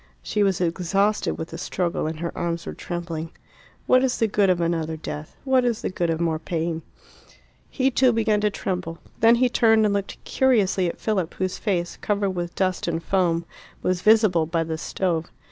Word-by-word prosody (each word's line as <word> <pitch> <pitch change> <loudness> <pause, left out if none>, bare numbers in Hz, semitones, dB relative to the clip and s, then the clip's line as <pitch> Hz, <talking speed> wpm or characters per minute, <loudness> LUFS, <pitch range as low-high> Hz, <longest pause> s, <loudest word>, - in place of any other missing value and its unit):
She 210 - -1
was 195 -2 +2
exhausted 185 +4 +1
with 160 - -5
the 165 - -7
struggle, 175 -3 -2
and 155 0 -5
her 170 - -4
arms 170 -1 -2
were - - -5
trembling. 170 -2 -5 0.6
"What 255 0 +4
is 260 -1 +1
the 225 - +2
good 200 -2 +2
of 180 -1 +2
another 165 -2 -1
death? 155 -1 -7
What 265 -2 +3
is 240 -3 -1
the - - -1
good 175 -2 -1
of 165 -1 0
more 165 -2 0
pain?" 165 0 -2 0.9
He 265 -1 +1
too 255 0 +4
began 220 -2 +1
to 210 - +3
tremble. 180 -4 -4 0.2
Then 230 +1 +6
he 250 +2 +3
turned 225 -2 +4
and 205 - +2
looked 200 -1 -3
curiously 205 -8 +2
at - - -7
Philip, 190 -7 -1
whose 185 -1 -2
face, 175 -5 -1
covered 200 -2 0
with 175 -2 -4
dust 185 -2 0
and 165 -1 -2
foam, 170 -2 +1 0.4
was 180 -1 0
visible 215 -7 +4
by 165 0 0
the 160 -1 -4
stove. 170 -2 -2
185 Hz, 195 wpm, -24 LUFS, 165-210 Hz, 0.9 s, Then